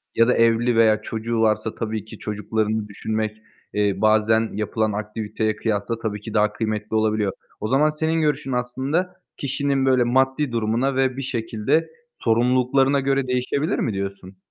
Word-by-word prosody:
ya 115 +1 +5
da 125 - +4
evli 115 +1 +3
veya 110 -1 +4
çocuğu 115 +1 -2
varsa 110 0 +1
tabii 110 -2 -3
ki 110 - -11
çocuklarını 105 +1 -2
düşünmek, 110 +1 -3 0.4
eee, 105 -1 +2
bazen 110 +1 +3
yapılan 110 +1 -1
aktiviteye 110 +1 -2
kıyasla 110 +1 -2
tabii 105 -2 -3
ki 110 0 -8
daha 105 -1 +2
kıymetli 110 -1 -3
olabiliyor. 110 -2 +1 0.3
O 105 - -2
zaman 140 +5 +3
senin 160 +2 0
görüşün 145 -3 0
aslında 130 +9 -1 0.2
kişinin 140 0 0
böyle 130 -2 +4
maddi 130 +3 +1
durumuna 115 +4 0
ve 130 -1 +1
bir - - -2
şekilde 115 +4 -1 0.3
sorumluluklarına 130 +4 +2
göre 135 -1 0
değişebilir 125 +4 0
mi 115 - 0
diyorsun? 95 -1 -5
115 Hz, 155 wpm, -23 LUFS, 110-130 Hz, 0.4 s, ya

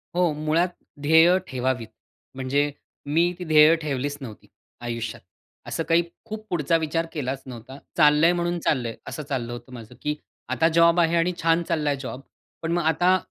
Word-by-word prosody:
हो. 175 -2 +3
मुळात 155 +4 +1 0.3
ध्येय 160 +5 +6
ठेवावीत. 125 -3 -2 0.5
म्हणजे 140 +2 0 0.4
मी 170 +2 +3
ती 180 - -4
ध्येय 155 +1 +6
ठेवलीच 145 -1 -2
नव्हती, 110 -5 -10 0.3
आयुष्यात. 115 -1 -4 0.5
असं 165 - -2
काही 165 +1 +4 0.2
खूप 215 -1 -7
पुढचा 165 -1 +1
विचार 165 +1 -1
केलाच 135 -3 -3
नव्हता. 130 +1 -10 0.2
चाललं 150 0 +5
आहे 175 - +5
म्हणून 175 0 -1
चाललं 130 -7 0
आहे. 115 - -8
असं 150 - -5
चाललं 130 -4 -3
होतं 120 +1 -10
माझं, 115 -3 -10
की 150 0 -1 0.3
आता 165 - +2
जॉब 170 +1 +5
आहे 165 0 +3
आणि 175 +2 +2
छान 165 +1 +3
चालला 155 -3 -1
आहे 140 -1 -1
जॉब. 130 0 -6 0.4
पण 165 0 -2
मग 175 0 +1
आता 175 +3 +3
155 Hz, 175 wpm, -24 LUFS, 130-170 Hz, 0.5 s, ध्येय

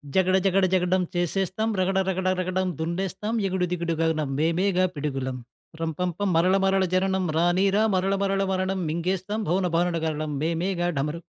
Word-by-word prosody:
జగడ 190 0 +3
జగడ 190 0 +3
జగడం 185 0 +2
చేసేస్తాం, 190 +5 -1
రగడ 190 +1 +1
రగడగడం 185 0 0
దున్నేస్తాం, 190 +6 -3
ఎగుడుదిగుడుగానం 165 -4 -1
మేమేగా 180 +3 +2
పిడుగులం. 135 -3 -3 0.4
రంపం 165 +3 -1
పం. 205 0 -1
మరల 180 +3 +4
మరల 195 0 +3
జననం 190 0 +1
రానీరా 190 +4 +3
మరల 190 +2 +1
మరల 195 0 +1
మరణం 190 0 -1
మింగేస్తాం 185 +5 -2
భౌనభాను 175 -1 +1
గరలం 155 -1 -2
మేమేగా 175 +2 -1
డమరు 150 +4 -2
185 Hz, 125 wpm, -25 LUFS, 165-190 Hz, 0.4 s, మరల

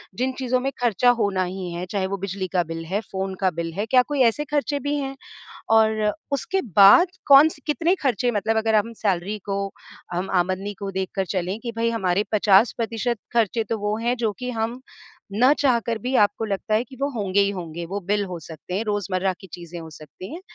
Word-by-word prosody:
जिन 255 +2 0
चीज़ों 255 -1 +1
में 270 +2 -2
खर्चा 245 +1 +3
होना 195 -2 +1
ही 185 0 -5
है, 175 +1 -4
चाहे 195 -2 0
वो 200 +1 -3
बिजली 190 0 -4
का 175 -1 +3
बिल 165 0 -6
है, 195 +5 -1
फ़ोन 190 0 -3
का 190 - +4
बिल 165 0 -4
है? 205 +4 -2
क्या 250 +3 +5
कोई 290 -3 0
ऐसे 245 +6 +2
खर्चे 290 -1 -1
भी 290 +1 -2
हैं? 270 0 -4 0.5
और 220 -1 +3 0.2
उसके 375 +8 -1 0.2
बाद 200 - +9 0.2
कौन 285 +3 +8
स - - -12
कितने 335 +5 +2
खर्चे 245 -1 +1
मतलब 220 +1 0
अगर 220 0 +2
हम 220 +2 +1
सैलरी 195 +1 0
को, 200 0 -2 0.5
हम 180 +2 -2
आमदनी 190 +3 -1
को 200 -1 -4
देखकर 190 +1 -2
चलें 185 +4 -2
कि 235 - -3
भई, 230 0 +1
हमारे 195 -3 +1
50% 225 +3 +2 0.2
खर्चे 225 0 +2
तो 225 - 0
वो 210 +1 -1
हैं, 240 +2 0
जो 225 -3 0
कि 250 0 -3
हम 230 +2 -3 0.5
ना 250 +6 +5
चाहकर 235 -6 +1
भी 255 +1 -2
आपको 205 +1 +3
लगता 205 +1 -2
है 225 - +2
कि 260 +2 -14
वो 280 - +1
होंगे 200 -2 0
ही 200 - +2
होंगे। 170 -2 -6
वो 195 +4 -4
बिल 205 0 +1
हो 180 -2 -6
सकते 160 +2 -10
हैं, 220 - -1
रोज़मर्रा 190 -2 -1
की 190 - -11
चीज़ें 175 -1 -8
हो 160 -1 -9
सकती 155 - -11
हैं। 350 - -7
210 Hz, 215 wpm, -23 LUFS, 190-240 Hz, 0.5 s, बाद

